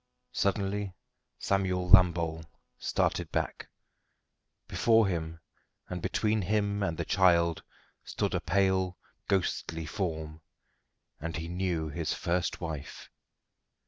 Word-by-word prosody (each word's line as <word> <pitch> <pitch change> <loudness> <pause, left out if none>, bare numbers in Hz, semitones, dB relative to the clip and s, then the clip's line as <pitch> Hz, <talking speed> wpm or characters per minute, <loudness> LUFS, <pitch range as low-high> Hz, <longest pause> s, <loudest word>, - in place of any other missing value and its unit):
Suddenly 100 -1 -1 0.4
Samuel 95 -2 0
Lambole 85 -3 +5 0.4
started - - 0
back. - - -2 1.0
Before 115 -1 +4
him, 80 -3 -3 0.5
and 90 -1 -4
between 110 +4 +1
him 100 +1 0
and 85 -5 -1
the - - -2
child, 85 -4 +3 0.4
stood - - -2
a - - +1
pale, 95 +1 +1 0.3
ghostly 80 -3 -1
form, 80 -3 -4 0.8
and 85 +3 -4
he 80 0 -4
knew 85 -3 -1
his 80 +1 -2
first 90 0 -1
wife. 80 -5 -6
90 Hz, 105 wpm, -30 LUFS, 80-95 Hz, 1.0 s, Lambole